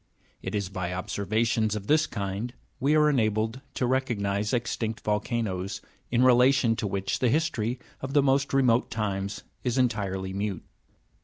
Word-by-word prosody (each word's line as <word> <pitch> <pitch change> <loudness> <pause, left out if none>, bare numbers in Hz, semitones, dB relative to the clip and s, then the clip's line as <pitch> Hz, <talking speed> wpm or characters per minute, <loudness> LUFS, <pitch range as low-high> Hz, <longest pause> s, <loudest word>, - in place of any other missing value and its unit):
It - - -4
is 100 -2 -1
by 90 -2 -4
observations 110 +3 0
of 105 -2 -5
this 155 +4 +3
kind 100 +3 -4 0.2
we 140 +4 +3
are 150 0 +5
enabled 110 -2 +1
to 125 - 0
recognise 105 -6 0
extinct 115 -2 -2
volcanoes, 105 -3 -1 0.3
in 120 +1 +3
relation 125 -1 +5
to 105 - -1
which 95 0 -2
the 125 - +3
history 130 -5 0 0.2
of 135 0 -4
the 145 -1 +5
most 135 0 +2
remote 125 -3 +3
times 100 -3 -3 0.2
is 125 0 0
entirely 100 -6 0
mute. 100 -2 -3
115 Hz, 150 wpm, -27 LUFS, 100-130 Hz, 0.3 s, are